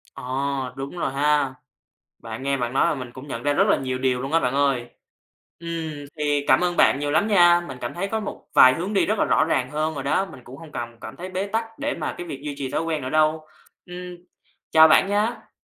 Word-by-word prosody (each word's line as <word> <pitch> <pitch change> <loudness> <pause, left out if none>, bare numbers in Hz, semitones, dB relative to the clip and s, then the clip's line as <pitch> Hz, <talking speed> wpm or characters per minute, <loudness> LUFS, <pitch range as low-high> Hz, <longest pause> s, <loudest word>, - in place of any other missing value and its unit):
À, - - -9 0.5
đúng 135 +5 -6
rồi 165 - -1
ha. 145 -1 +1 0.6
Bạn 115 +2 -8
nghe 140 0 0
bạn 120 -2 -3
nói 135 - +3
mà - - +1
mình 125 -3 -7
cũng 130 +3 -11
nhận 115 -3 -5
ra 145 - +1
rất - - +3
là - - +4
nhiều 130 -1 -3
điều 130 -1 0
luôn 135 +3 -5
á, 165 - +4
bạn 125 -2 -1
ơi. 135 -4 +1 0.7
Ừm, 165 -1 -4 0.2
thì 145 -1 0
cảm - - +5
ơn 175 -1 -1
bạn - - +4
nhiều 145 0 -1
lắm 155 +7 +2
nha. 175 -4 +6
Mình 135 -2 -8
cảm 120 - -5
thấy 195 +3 -3
có 220 +2 -2
một 205 - -7
vài 130 0 +8
hướng 180 +7 -4
đi 200 - +2
rất 215 +1 0
là - - +3
rõ - - +3
ràng 130 -5 0
hơn 155 +1 -1
rồi 140 -2 -5
đó. 170 +7 +1
Mình 155 -8 -12
cũng 130 - -11
hông 160 0 -13
cần 120 0 -6
cảm 110 - -9
thấy 180 +2 -7
bế 185 +1 -3
tắc 225 +2 -4
để 285 +1 -2
mà - - -4
cái 175 - -6
việc 135 -5 -7
duy 145 -1 -4
trì 135 -2 -4
thói - - -1
quen 160 -3 -2
nữa 130 - -4
đâu. 155 +1 +2 0.4
Ừm, 180 0 -8 0.5
chào 160 0 +8
bạn 155 - +5
nha! 210 +4 -1
150 Hz, 255 wpm, -23 LUFS, 135-175 Hz, 0.7 s, vài